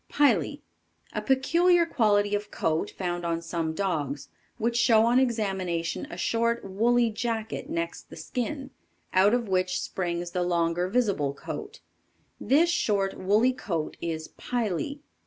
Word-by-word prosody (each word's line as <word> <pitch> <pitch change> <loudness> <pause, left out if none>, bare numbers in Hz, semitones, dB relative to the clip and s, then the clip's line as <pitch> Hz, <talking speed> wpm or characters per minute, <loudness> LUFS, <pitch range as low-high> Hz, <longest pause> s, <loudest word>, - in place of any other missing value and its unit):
Pily. 240 - +2 0.5
A 210 - -2
peculiar 335 +9 +3
quality 210 -8 +2
of 205 0 -1
coat 160 0 -1
found 175 -2 -3
on 170 -1 -1
some 165 -1 -3
dogs, 145 -8 -2 0.3
which 235 0 0
show 225 -2 +5
on 240 +2 +4
examination 190 -9 -1
a 175 - -8
short 230 +5 0
woolly 230 +4 +2
jacket 225 +4 -3
next 335 +1 -4
the - - -10
skin, 270 +2 -4 0.4
out 195 +5 +5
of 240 -2 -1
which 185 -1 +1
springs 175 -1 -3
the 180 - -1
longer 175 0 +1
visible 190 - 0
coat. 420 - -7 0.6
This 320 +6 +3
short 200 - +1
woolly 215 +7 +3
coat 170 -10 -3
is 160 -2 -3
"pily." 245 - -2
205 Hz, 140 wpm, -27 LUFS, 175-245 Hz, 0.6 s, show